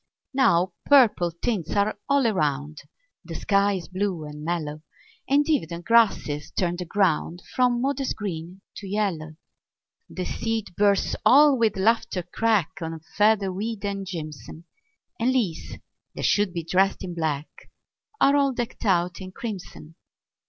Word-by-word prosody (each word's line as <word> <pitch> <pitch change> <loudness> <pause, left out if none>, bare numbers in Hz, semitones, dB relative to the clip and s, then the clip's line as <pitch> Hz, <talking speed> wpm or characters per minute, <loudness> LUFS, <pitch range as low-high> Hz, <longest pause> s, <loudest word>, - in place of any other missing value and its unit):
Now 200 -9 +3
purple 235 -11 +5
tints 175 0 -3
are 205 +1 +2
all 280 -2 +3
around; 150 -7 -1 0.4
The - - -8
sky 200 0 +2
is 180 -5 -5
blue 185 -3 -2
and 150 0 -9
mellow; 155 -2 -3 0.5
And 285 +1 +3
e'en 295 - +1
the 170 -1 -5
grasses 195 -8 +2
turn 175 -1 -1
the 180 - -4
ground 175 -2 0
From 250 -1 +2
modest 275 +1 -1
green 185 -2 -6 0.2
to 200 - -8
yellow. 185 -6 -2 0.7
The 185 - -5
seed 225 -1 -2
burrs 200 -1 +2
all 290 +1 +7
with 225 -5 +1
laughter 225 -2 +1
crack 205 -1 +1
On 165 0 -4 0.2
featherweed 210 0 +1
and 200 -1 -3
jimson; 160 -2 -7 0.6
And 245 +3 +2
leaves 205 -11 -2 0.4
that - - -3
should 205 -2 +2
be 170 -1 -4
dressed 190 +4 +1
in 180 -2 -5
black 155 -3 -2 0.7
Are 280 - +5
all 280 -2 +2
decked 240 -1 -5
out 180 -2 +1
in 185 0 -8
crimson. 185 -7 -8
195 Hz, 145 wpm, -25 LUFS, 170-225 Hz, 0.7 s, all